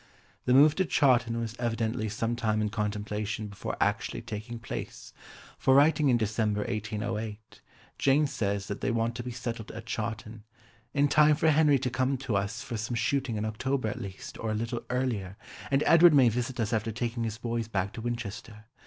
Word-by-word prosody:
The 125 - +3
move 145 +2 +7
to 190 - +2
Chawton 125 -7 +3
was 115 -1 -4
evidently 115 -1 -1
some 115 +3 -1
time 110 -2 0
in 105 -1 0
contemplation 105 0 -3
before 100 - -5
actually - - 0
taking 110 +3 -6
place, 115 - -7 0.5
for 130 - +4
writing 145 0 +5
in 120 - +4
December 110 -1 0
1808, 110 0 -4 0.4
Jane 140 +2 +4
says 100 -7 -2
that 100 - -5
they - - 0
want 115 0 0
to - - -3
be 125 - -6
settled 115 -2 -5
at 115 +1 -8
Chawton 110 -1 -5 0.5
"in 145 +2 +3
time 150 +1 +5
for 160 +1 +3
Henry 150 -2 +5
to 125 -1 -2
come 130 +2 0
to 125 -4 -3
us 100 +5 -2
for 120 - -4
some 110 +3 -3
shooting 130 -1 0
in 105 0 -2
October 120 +2 -1
at - - -5
least, 100 +7 -8
or 115 - -3
a 110 - 0
little 115 +2 -3
earlier, 115 -7 -2 0.3
and 135 +1 +2
Edward 165 -1 +7
may 130 -4 +6
visit 125 +2 -3
us 110 0 0
after 110 0 0
taking 120 +1 -3
his 110 -1 -3
boys 115 -1 -3
back 100 -2 -2
to 115 - -6
Winchester. 115 -2 -5
115 Hz, 190 wpm, -29 LUFS, 110-130 Hz, 0.5 s, move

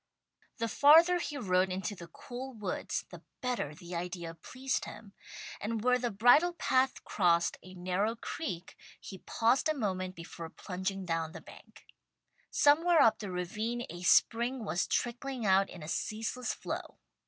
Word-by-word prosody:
The 230 - -1
farther 325 +8 +6
he 295 -4 -4
rode 185 -6 +2
into 190 +2 -3
the 175 -3 -10
cool 255 +7 -8
woods 210 -5 -3
the - - -10 0.2
better 245 - -2
the 175 +3 -10
idea 170 -1 -4
pleased 255 +10 -3
him, 205 -3 -11 0.5
and 220 +1 -3
where 250 0 +3
the 240 -1 -1
bridle 245 - +5
path 260 -5 +1
crossed 170 -3 +2
a 185 0 -13
narrow 185 +5 -1
creek 225 - -5 0.2
he 190 - -9
paused 235 - +1
a 310 - +1
moment 185 -5 -2
before 165 0 -8
plunging 190 +2 -4
down 165 -2 -2
the - - -7
bank. - - -16 0.6
Somewhere 325 +4 +4
up 220 -1 +5
the 205 -3 -5
ravine 215 +7 -3
a 175 +1 -8
spring 235 +6 +3
was 175 -1 0
trickling 245 0 -2
out 195 0 +4
in 175 - -10
a - - -7
ceaseless 225 +7 -2
flow. - - -6
215 Hz, 155 wpm, -31 LUFS, 180-250 Hz, 0.6 s, farther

